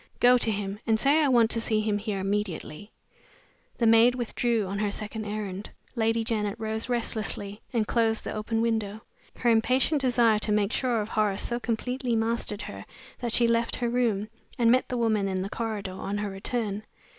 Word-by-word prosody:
"Go 245 +1 +6
to 230 - 0
him, 200 -1 -3
and 220 -1 +3
say 285 +5 +4
I 295 - +3
want 235 -4 +4
to 230 - 0
see 220 -2 +1
him 210 -1 0
here 210 -1 -3
immediately." 195 -2 -3 0.9
The 235 - +1
maid 230 +2 +6
withdrew 235 -2 0
on 200 +2 -4
her 210 -1 +1
second 215 +1 -5
errand. 205 -2 -5 0.3
Lady 225 0 +1
Janet 210 -3 -1
rose 220 +1 -3
restlessly, 215 -3 -1
and 230 -3 +1
closed 225 0 +1
the - - -4
open 225 +1 -1
window. 220 -2 -1 0.4
Her 240 - +2
impatient 255 +6 +2
desire 240 -4 +3
to 210 - -1
make 210 0 +2
sure 245 -4 +1
of 210 - -5
Horace 210 -3 0
so 240 0 -1
completely 245 +1 -2
mastered 225 -2 -1
her - - -7 0.4
that 240 -2 -2
she 235 +1 +3
left 230 0 +1
her 240 -1 -1
room, 230 -4 +1 0.3
and 230 -1 +4
met 255 +1 +2
the 250 - -2
woman 220 -4 +1
in 190 -1 -1
the 195 - -4
corridor 215 -4 -3
on 195 +2 -4
her 205 -1 -3
return. 205 +1 -3
220 Hz, 190 wpm, -27 LUFS, 210-235 Hz, 0.9 s, Go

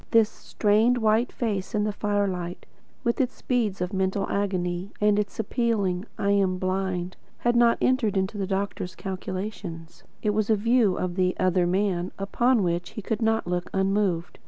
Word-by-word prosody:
This 225 -2 +5
strained 220 +3 +2
white 225 +2 +2
face 210 -4 -2
in 210 - +2
the 210 0 -1
firelight, 195 -4 -2 0.4
with 235 +2 +1
its 255 -1 -3
beads 220 -7 0
of 180 +2 -2
mental 190 +1 0
agony 185 -2 -1
and 210 0 +3
its 210 +2 -3
appealing 210 -5 0
"I 200 - +1
am 195 -2 +2
blind," 185 -1 -2 0.2
had 240 0 +1
not 235 -1 +5
entered 240 -6 +2
into 190 +2 0
the 195 -2 -2
doctor's 195 -2 -3
calculations. 185 -3 -6 0.2
It 210 - +2
was 210 0 0
a 220 - +5
view 225 -1 +3
of 180 -1 -2
"the 185 -1 +2
other 185 -1 +2
man" 185 -1 0
upon 235 +3 +2
which 175 0 -1
he 215 - -4
could 220 +3 -2
not 225 0 +2
look 175 0 -2
unmoved. 190 -3 0
200 Hz, 170 wpm, -26 LUFS, 185-215 Hz, 0.4 s, This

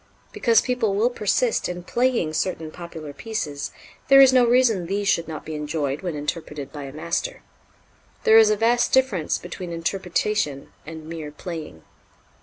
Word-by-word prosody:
Because 230 -2 +3
people 245 -6 0
will 230 +5 +2
persist 230 +2 0
in 180 0 -5
"playing" 235 -7 0
certain 160 -1 -2
popular 160 -4 -9
pieces, 150 -9 -4 0.4
there 275 0 +8
is 265 -1 +8
no 255 -1 +6
reason 235 -7 +3
these 200 +2 -1
should 170 -4 +2
not 155 -2 -7
be 160 - -6
enjoyed 150 -2 -2
when 175 -4 -3
interpreted 150 -1 -5
by 145 -2 -6
a 135 - -8
master. 170 - -3 0.8
There 220 0 +7
is 220 -1 +6
a 215 - +2
vast 235 +3 +2
difference 235 -12 +2
between 175 0 -7
interpretation 175 -2 -2
and 160 -1 -8
mere 160 -2 -6
"playing." 155 - -8
175 Hz, 160 wpm, -23 LUFS, 155-225 Hz, 0.8 s, there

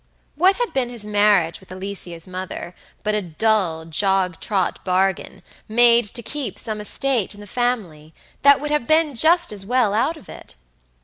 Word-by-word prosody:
What 370 +6 +4
had 485 -1 -3
been 255 -2 0
his 240 -3 -9
marriage 205 -5 +2
with 190 - -17
Alicia's 185 -3 -7
mother 185 -1 -6 0.3
but 215 +1 0
a 210 - 0
dull, 180 -2 0
jog 185 +1 +1
trot 195 -4 -1
bargain 190 0 -1 0.3
made 235 +1 +5
to 235 - -2
keep 290 +1 -4
some 215 -1 -4
estate 235 -1 -1
in - - -14
the 205 - -10
family 200 -10 -3 0.3
that 280 0 +6
would 295 +1 -4
have 300 -6 0
been 315 -1 +3
just 335 +6 +3
as 200 -2 -4
well 235 -1 +1
out 270 +10 0
of 310 - -16
it? - - -12
210 Hz, 175 wpm, -21 LUFS, 185-250 Hz, 0.3 s, that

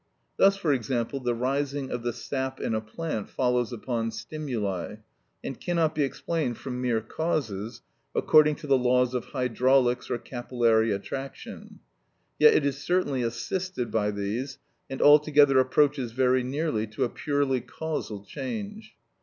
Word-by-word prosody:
Thus, 195 0 +5
for 165 -7 +1
example, 125 +1 -2
the 120 -2 -1
rising 135 +2 -2
of 120 - -3
the 120 0 -1
sap 130 +2 -4
in - - -2
a 110 - 0
plant 110 0 -5
follows 125 -2 0
upon 115 -1 -2
stimuli, 110 - -4 0.5
and 135 - -6
cannot 165 -3 +1
be 155 - -1
explained 140 -2 -1
from 125 -2 -5
mere 120 -3 +1
causes, 115 - -3 0.3
according 150 -1 +5
to - - -11
the 135 -2 +3
laws 125 0 +2
of 125 -2 -2
hydraulics 125 -1 +1
or - - 0
capillary 120 -3 +1
attraction; 135 +7 -6 0.6
yet 150 - +7
it 145 - +3
is 140 0 -1
certainly 160 -8 0
assisted 125 - -3
by 105 -2 +1
these, 105 +7 -3 0.3
and 135 - -2
altogether 145 -2 +6
approaches 130 -2 +2
very 130 0 +3
near 150 +5 -1 0.2
to 110 - -3
a - - +2
purely 140 -1 0
causal 130 -12 -5
change. 215 - -6
130 Hz, 145 wpm, -27 LUFS, 120-145 Hz, 0.6 s, yet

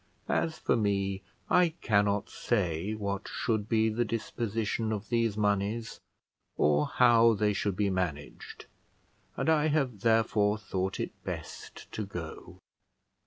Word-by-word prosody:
As 160 -1 0
for - - +1
me, 100 -3 0 0.3
I 175 -3 +3
cannot 100 -2 +2
say 95 -2 -1
what 100 -1 -3
should 110 -3 -2
be 110 -1 +3
the 110 +2 0
disposition 115 -1 -2
of 105 -1 -4
these 115 -3 +1
moneys, 105 +2 -1 0.6
or 75 0 +3
how 115 -2 +5
they 105 0 +1
should 100 -1 -1
be 100 0 +1
managed, 85 -6 -4 0.7
and - - -1
I 155 -1 +4
have 135 -8 0
therefore 110 -1 +2
thought 95 -2 -3
it - - -2
best - - -8
to 110 - -3
go." 85 -5 -8
105 Hz, 130 wpm, -29 LUFS, 100-115 Hz, 0.7 s, how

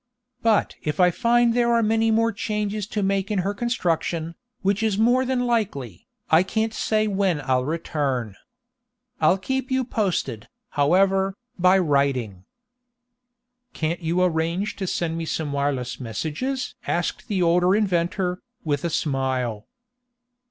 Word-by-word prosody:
But 225 -2 +2
if 150 +3 -3
I 180 -1 +6
find 235 +3 +3
there 235 0 +2
are 230 -1 +3
many 225 +1 +2
more 230 +1 +3
changes 210 -1 -2
to 210 -1 -2
make 195 +1 0
in 210 - 0
her 200 - 0
construction, 170 -7 -1 0.3
which 200 +2 +1
is 220 -3 +1
more 245 +4 +3
than 255 -1 0
likely, 140 - -2 0.2
I 160 +2 +7
can't 220 +4 -1
say 215 -1 +1
when 195 -5 +1
I'll 130 -2 0
return. 140 - -2 0.8
I'll 185 - +4
keep 265 +7 -2
you 260 -1 +1
posted, 180 - -2 0.2
however, 190 +6 +2 0.2
by 185 +2 +5
writing." 140 - 0 1.3
"Can't 165 +3 -2
you 170 +2 +1
arrange 170 +3 0
to 190 - -3
send 165 -2 -2
me 165 - -3
some 155 -2 -3
wireless 140 -3 -1
messages?" 160 - -3
asked 175 +7 -2
the 195 -5 0
older 180 +3 +4
inventor, 180 -2 0 0.2
with 145 -3 -1
a 170 - 0
smile. 130 -7 -1
180 Hz, 140 wpm, -24 LUFS, 150-215 Hz, 1.3 s, I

